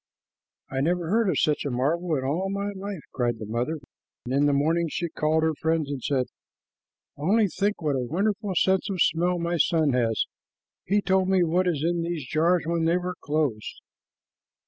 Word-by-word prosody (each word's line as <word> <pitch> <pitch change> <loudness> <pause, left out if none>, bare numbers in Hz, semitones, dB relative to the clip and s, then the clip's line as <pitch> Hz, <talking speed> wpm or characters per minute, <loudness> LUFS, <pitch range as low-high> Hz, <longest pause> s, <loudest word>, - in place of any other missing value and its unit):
"I 135 0 -1
never 175 +2 0
heard 225 -1 +3
of 160 - 0
such 150 -1 +1
a 145 - -2
marvel 155 +7 0
in 130 - -2
all 165 +9 -1
my 200 +1 -2
life," 195 -3 -6
cried 120 -2 0
the 110 - -6
mother; 120 +9 -2 0.5
and 125 - -3
in 140 +2 +3
the - - +3
morning 160 +4 +2
she 170 +2 -3
called 155 0 +1
her 160 0 +2
friends 160 -3 0
and 140 -2 -4
said, 130 -1 0 0.9
"Only 200 +9 +3
think 200 0 -1
what 150 -2 +1
a - - 0
wonderful 195 - -1
sense 190 +3 +2
of 190 -2 -3
smell 175 +3 +2
my 170 0 -1
son 155 -3 +2
has! 115 -3 +1 0.6
He 205 +3 +2
told 190 -1 +2
me 190 -2 +4
what 175 +2 +1
was 155 -5 0
in 170 +1 +1
these 165 -5 -3
jars 170 +4 +2
when 165 0 0
they 170 +2 +3
were 180 0 -3
closed." 145 -8 -2
165 Hz, 190 wpm, -26 LUFS, 145-180 Hz, 0.9 s, me